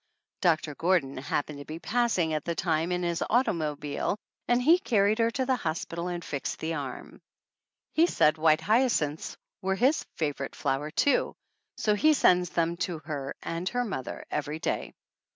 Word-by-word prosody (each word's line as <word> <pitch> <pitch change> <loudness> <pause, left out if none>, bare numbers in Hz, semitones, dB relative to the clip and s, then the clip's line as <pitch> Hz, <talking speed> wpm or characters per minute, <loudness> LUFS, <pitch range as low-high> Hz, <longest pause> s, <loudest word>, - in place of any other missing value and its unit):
Doctor 160 -4 +2
Gordon 160 -4 +1
happened 145 +2 -2
to 145 - -8
be 155 - -6
passing 200 -5 +1
at 155 -2 -1
the 170 - -2
time 165 +1 0
in 180 0 0
his 170 -1 0
automobile 155 - 0 0.3
and 240 0 +3
he 320 +8 +5
carried 215 - +2
her 230 0 +4
to 260 +2 -1
the 260 0 +2
hospital 170 -1 -3
and 175 -1 -4
fixed 140 -2 -3
the 160 +1 -3
arm. 140 -5 -6 0.7
He 330 +2 +5
said 155 - +3
white 155 0 +4
hyacinths 210 - +1 0.2
were 190 0 0
his 260 +9 +2
favorite 145 -4 -3
flower, 140 +3 -1
too, 280 - +2 0.4
so 210 - +2
he 305 +9 +4
sends 180 -8 +4
them 170 0 0
to 175 -1 -2
her 140 -3 -4
and 170 +2 -2
her 245 0 -1
mother 130 - -5
every 150 +1 -2
day. 160 - -3
170 Hz, 170 wpm, -28 LUFS, 155-215 Hz, 0.7 s, he